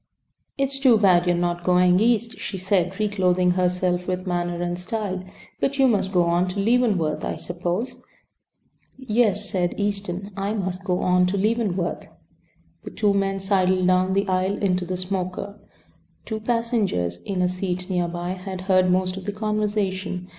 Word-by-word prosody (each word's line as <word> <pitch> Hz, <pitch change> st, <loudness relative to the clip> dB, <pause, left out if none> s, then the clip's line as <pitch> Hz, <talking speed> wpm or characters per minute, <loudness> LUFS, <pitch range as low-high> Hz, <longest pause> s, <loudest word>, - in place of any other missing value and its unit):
"It's 275 Hz, 0 st, -1 dB
too 255 Hz, -4 st, +5 dB
bad 180 Hz, -4 st, +4 dB
you 175 Hz, -, +4 dB
are -, -, -1 dB
not 175 Hz, 0 st, -1 dB
going 180 Hz, 0 st, +4 dB
East," 230 Hz, +1 st, +1 dB
she 195 Hz, -, -4 dB
said, 185 Hz, 0 st, 0 dB
reclothing 185 Hz, -4 st, +2 dB
herself 180 Hz, 0 st, 0 dB
with 185 Hz, 0 st, -2 dB
manner 175 Hz, -1 st, -2 dB
and 175 Hz, 0 st, -2 dB
style. 190 Hz, -1 st, -3 dB, 0.4 s
"But 275 Hz, +1 st, 0 dB
you 270 Hz, -1 st, +5 dB
must 200 Hz, -5 st, +1 dB
go 180 Hz, -3 st, +3 dB
on 170 Hz, +2 st, +1 dB
to 185 Hz, +2 st, -4 dB
Leavenworth, 205 Hz, -8 st, +1 dB
I -, -, -2 dB
suppose?" 175 Hz, +6 st, -3 dB, 1.0 s
"Yes," 215 Hz, -5 st, +1 dB
said 180 Hz, -3 st, -1 dB
Easton, 200 Hz, -1 st, -2 dB
"I 200 Hz, +2 st, -2 dB
must 190 Hz, -2 st, -3 dB
go 180 Hz, -2 st, 0 dB
on 180 Hz, 0 st, +3 dB
to 195 Hz, +2 st, -1 dB
Leavenworth." 200 Hz, -4 st, -1 dB, 0.8 s
The -, -, -7 dB
two 205 Hz, -2 st, +1 dB
men 195 Hz, 0 st, 0 dB
sidled 185 Hz, -1 st, +2 dB
down 185 Hz, +1 st, +3 dB
the 200 Hz, +1 st, +1 dB
aisle 185 Hz, +1 st, 0 dB
into 185 Hz, -2 st, 0 dB
the 185 Hz, +1 st, -3 dB
smoker. 185 Hz, +2 st, -4 dB, 0.6 s
The -, -, -15 dB
two 220 Hz, -1 st, -2 dB
passengers 220 Hz, -, -1 dB
in 185 Hz, -2 st, -2 dB
a -, -, +3 dB
seat 180 Hz, 0 st, -3 dB
near 180 Hz, -2 st, 0 dB
by 175 Hz, +1 st, -4 dB
had 185 Hz, 0 st, -6 dB
heard 185 Hz, -1 st, +3 dB
most 185 Hz, +1 st, +1 dB
of 190 Hz, -, -8 dB
the 205 Hz, -, -2 dB
conversation. 205 Hz, -3 st, -2 dB
185 Hz, 170 wpm, -23 LUFS, 180-205 Hz, 1.0 s, too